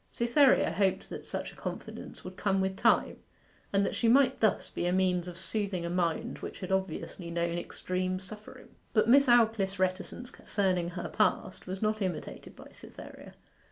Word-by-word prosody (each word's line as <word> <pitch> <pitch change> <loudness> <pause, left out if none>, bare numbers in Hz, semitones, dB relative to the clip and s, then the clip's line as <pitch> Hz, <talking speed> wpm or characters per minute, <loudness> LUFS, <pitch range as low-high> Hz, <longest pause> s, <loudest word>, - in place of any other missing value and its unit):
Cytherea 255 +3 +4
hoped 190 -1 0
that - - -7
such - - -4
a - - -17
confidence - - -7
would 185 - -8
come 195 0 +1
with 190 0 0
time, - - +2 0.5
and 200 0 +2
that - - -2
she 235 - +1
might 260 +2 +4
thus 220 -3 +2
be 175 - -2
a - - +1
means 180 -1 +1
of 175 -1 -7
soothing 190 -2 -2
a 170 - -3
mind 175 -2 -1
which - - -8
had 185 - -5
obviously 190 -2 -2
known 170 0 -1
extreme 185 +1 -3
suffering. 210 +3 -12 0.2
But 215 -1 +3
Miss 275 +3 +6
Aldclyffe's 220 -5 +3
reticence 185 +6 -2
concerning 185 -4 -1
her 175 0 -5
past 210 -3 0
was 190 +3 -4
not 215 0 0
imitated 185 -5 -4
by - - -13
Cytherea. - - -12
190 Hz, 175 wpm, -30 LUFS, 180-215 Hz, 0.5 s, Miss